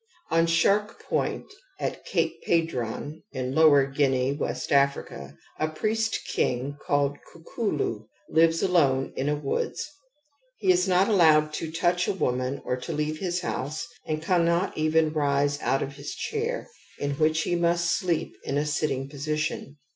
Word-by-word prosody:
Qn 165 0 +3
Shark 205 +6 +2
Point - - -1 0.3
at - - -3
Cape - - -1
Padron 155 -2 -1
in 130 -1 -3
Lower 145 -3 +6
Guinea 135 -1 +1
(West 145 - -3
Africa), 140 - 0 0.2
a 155 - +1
priest 220 +7 -1
king 130 +3 0
called 145 0 +1
Kukulu 155 - -3 0.2
lives 165 +1 +3
alone 140 -8 +2
in 140 +2 -1
a 150 - +1
woods. 145 -2 -2 0.7
He 190 -3 +3
is 180 +1 +2
not 185 +1 +4
allowed 155 -7 +4
to 160 +1 -4
touch 175 +2 +1
a - - +1
woman 130 -5 -1
or 125 - -1
to 130 - -6
leave 155 0 -2
his 180 -1 -1
house 150 -3 -3 0.2
and 155 0 -3
cannot 170 +1 +2
evenrise 150 -2 +1
out 135 - +1
of 140 +1 -7
his 145 0 -6
chair, 455 +3 -3 0.3
in 145 - -2
which 155 0 +3
he - - -1
must 170 0 +2
sleep 175 -4 -1
in 140 - -2
a 145 - +1
sitting 150 -3 -1
position. 150 0 -3
155 Hz, 150 wpm, -26 LUFS, 140-170 Hz, 0.7 s, Lower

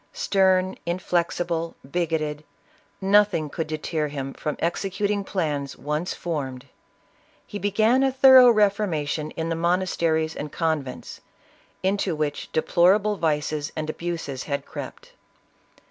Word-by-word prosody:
Stern, 190 - +2
inflexible, 170 -1 -1 0.2
bigoted, 155 -3 -1 0.6
nothing 195 -6 +3
could 160 - -3
deter 155 0 -2
him 135 -2 -5
from 150 - -4
executing 200 +4 -1
plans 150 -8 -3
once 150 +6 -3
formed. 135 -7 -4 0.8
He 205 - -7
began 215 +6 +2
a 270 0 +3
thor 265 0 +7
ough 250 -1 +9
reformation 175 -8 +1
in 165 0 -2
the 165 - -1
monasteries 165 -2 0
and 150 0 -5
convents, 155 -6 -3 0.6
into 190 -2 0
which 150 -1 -3
deplorable 195 +6 +3
vices 150 -2 -1
and 155 0 -2
abuses 165 -6 -5
had 140 -2 -3
crept. - - -9
170 Hz, 115 wpm, -24 LUFS, 150-195 Hz, 0.8 s, ough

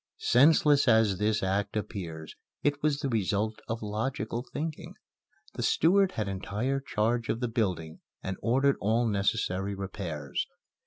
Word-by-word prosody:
Senseless 145 +1 +5
as 110 -5 +4
this 105 0 +1
act 100 +2 0
appears 85 -7 -5 0.3
it 145 0 +1
was 145 -1 +1
the 140 - -1
result 110 -1 0
of 115 0 -3
logical 110 +2 -2
thinking. 155 +1 -5 0.6
The - - -5
steward 190 +4 +3
had 110 -2 -2
entire 105 +8 -2
charge 115 -2 -1
of 115 - 0
the 125 - -1
building 90 -9 -2 0.2
and 95 - -3
ordered 135 +4 +2
all 115 +4 +2
necessary 100 -2 0
repairs. 90 -7 -4
110 Hz, 140 wpm, -29 LUFS, 100-130 Hz, 0.6 s, Senseless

